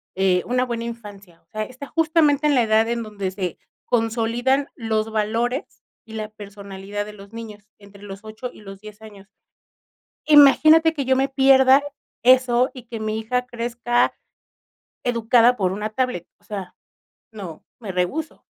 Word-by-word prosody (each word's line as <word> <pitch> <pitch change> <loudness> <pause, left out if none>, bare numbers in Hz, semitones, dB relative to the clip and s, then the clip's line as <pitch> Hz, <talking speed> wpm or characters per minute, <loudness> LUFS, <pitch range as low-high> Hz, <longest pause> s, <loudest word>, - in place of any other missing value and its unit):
eh, 185 -1 +2
una 250 +1 0
buena 235 -2 -4
infancia. 205 -7 -10
O - - -44
sea, 215 +4 -4
está 255 +4 -9
justamente 310 -2 +2
en 295 -1 +3
la 250 - +4
edad 220 0 +3
en 235 0 -2
donde 200 -3 -5
se 185 -3 -4 0.3
consolidan 240 +4 0
los 220 -2 -2
valores 225 +5 -2 0.2
y 225 - -13
la 215 -1 -5
personalidad 200 -1 -7
de 210 - -10
los 200 +1 -14
niños, 220 -3 -9 0.2
entre 200 0 -16
los 195 0 -9
8 220 +3 -7
y - - -15
los 195 -1 -11
10 215 0 -12
años. 205 -2 -14 1.0
Imagínate 310 +2 +6
que 285 -4 -3
yo 260 +1 +3
me 270 +1 +1
pierda 270 0 +5 0.4
eso 255 0 +4
y 255 - -10
que 230 -1 -6
mi 215 0 -2
hija 250 +3 -2
crezca 240 0 -1 0.9
educada 240 0 +3
por 190 -5 0
una 210 +3 -3
tablet, 250 -7 -2
o - - -33
sea, 200 -3 -7 0.6
no, 190 -8 -9
me 215 -5 -6
rehúso. 185 - -3
225 Hz, 160 wpm, -22 LUFS, 205-255 Hz, 1.0 s, Imagínate